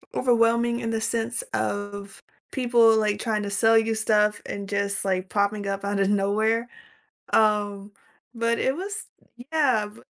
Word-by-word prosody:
overwhelming 235 Hz, -1 st, +2 dB
in 230 Hz, -2 st, -3 dB
the 225 Hz, -1 st, -2 dB
sense 230 Hz, +1 st, -1 dB
of 205 Hz, 0 st, -4 dB, 0.3 s
people, 235 Hz, -3 st, +4 dB
like, 210 Hz, -2 st, 0 dB
trying 215 Hz, -2 st, -1 dB
to 200 Hz, -, -4 dB
sell 225 Hz, +3 st, +4 dB
you 225 Hz, 0 st, +2 dB
stuff 210 Hz, -1 st, +1 dB
and 200 Hz, -1 st, -6 dB
just, 200 Hz, 0 st, -1 dB
like, 185 Hz, -1 st, -1 dB
popping 205 Hz, 0 st, 0 dB
up 195 Hz, 0 st, -3 dB
out 200 Hz, 0 st, -1 dB
of 195 Hz, -, +2 dB
nowhere, 215 Hz, +3 st, +1 dB, 0.7 s
um, 205 Hz, -2 st, +1 dB, 0.5 s
but 230 Hz, 0 st, 0 dB
it 265 Hz, -, 0 dB
was 405 Hz, +6 st, -5 dB, 0.5 s
yeah, 260 Hz, -9 st, +2 dB
b 210 Hz, +2 st, -16 dB
215 Hz, 155 wpm, -25 LUFS, 200-230 Hz, 0.7 s, people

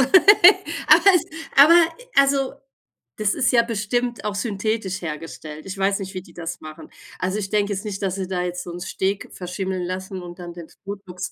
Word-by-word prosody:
aber 370 Hz, +10 st, +5 dB
es 345 Hz, -, +2 dB, 0.3 s
aber 300 Hz, +5 st, +8 dB, 0.4 s
also, 275 Hz, -1 st, +3 dB, 0.6 s
das 210 Hz, -1 st, +1 dB
ist 255 Hz, -, +1 dB
ja 235 Hz, -2 st, +5 dB
bestimmt 235 Hz, 0 st, -2 dB
auch 210 Hz, -, -2 dB
synthetisch 200 Hz, -1 st, -2 dB
hergestellt. 155 Hz, -1 st, -7 dB
Ich 195 Hz, 0 st, -7 dB
weiß 195 Hz, +1 st, +1 dB
nicht, 190 Hz, 0 st, -6 dB
wie 185 Hz, -, -5 dB
die -, -, -18 dB
das 165 Hz, -1 st, -6 dB
machen. 155 Hz, +1 st, -11 dB, 0.3 s
Also 185 Hz, +3 st, -2 dB
ich 195 Hz, -, -3 dB
denke 205 Hz, 0 st, 0 dB
jetzt 200 Hz, +2 st, -5 dB
nicht, 195 Hz, -1 st, -5 dB
dass 190 Hz, -1 st, -1 dB
sie 190 Hz, -1 st, -4 dB
da 180 Hz, -2 st, -2 dB
jetzt 180 Hz, 0 st, -4 dB
so 175 Hz, -, -8 dB
'n 175 Hz, -, -7 dB
Steak 195 Hz, +2 st, -3 dB
verschimmeln 185 Hz, 0 st, -4 dB
lassen 185 Hz, +1 st, -5 dB
und 175 Hz, 0 st, -10 dB
dann 175 Hz, -1 st, -8 dB
das 170 Hz, -2 st, -12 dB
Botox 190 Hz, -2 st, -7 dB
195 Hz, 190 wpm, -22 LUFS, 180-215 Hz, 0.6 s, aber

